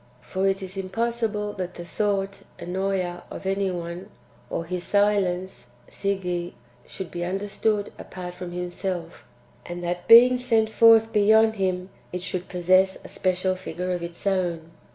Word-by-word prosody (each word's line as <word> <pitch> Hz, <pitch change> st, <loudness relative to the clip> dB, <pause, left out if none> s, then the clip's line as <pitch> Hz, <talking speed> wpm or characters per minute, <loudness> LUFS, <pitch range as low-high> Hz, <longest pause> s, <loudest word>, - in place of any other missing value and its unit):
For 190 Hz, +9 st, -1 dB
it 195 Hz, 0 st, 0 dB
is 190 Hz, +1 st, -6 dB
impossible 210 Hz, +1 st, -1 dB
that 180 Hz, -1 st, -4 dB
the 175 Hz, -, -7 dB
thought 195 Hz, +1 st, -1 dB, 0.2 s
(Ennoea) 185 Hz, -1 st, -2 dB
of -, -, -8 dB
any 195 Hz, 0 st, 0 dB
one, 175 Hz, +2 st, -5 dB, 0.4 s
or 165 Hz, -, -3 dB
his 180 Hz, +1 st, -4 dB
silence 190 Hz, -9 st, +1 dB, 0.2 s
(Sige), 180 Hz, -3 st, -2 dB, 0.3 s
should 190 Hz, -3 st, -7 dB
be 175 Hz, 0 st, -4 dB
under 195 Hz, +3 st, -2 dB
stood 205 Hz, 0 st, 0 dB
apart 180 Hz, -1 st, -7 dB
from 180 Hz, -1 st, -7 dB
himself; 180 Hz, -1 st, -4 dB, 0.4 s
and 175 Hz, 0 st, -6 dB
that, 175 Hz, 0 st, -3 dB
being 245 Hz, +2 st, +9 dB
sent 225 Hz, -3 st, +2 dB
forth 225 Hz, 0 st, +6 dB
beyond 220 Hz, +1 st, +5 dB
him, 185 Hz, -1 st, -1 dB, 0.2 s
it 180 Hz, 0 st, -4 dB
should 185 Hz, -1 st, -4 dB
possess 185 Hz, +1 st, +3 dB
a -, -, -10 dB
special 185 Hz, 0 st, 0 dB
figure 185 Hz, -1 st, -4 dB
of 175 Hz, -1 st, -2 dB
its 170 Hz, +2 st, -7 dB
own. 175 Hz, -4 st, -1 dB
185 Hz, 155 wpm, -25 LUFS, 175-205 Hz, 0.4 s, being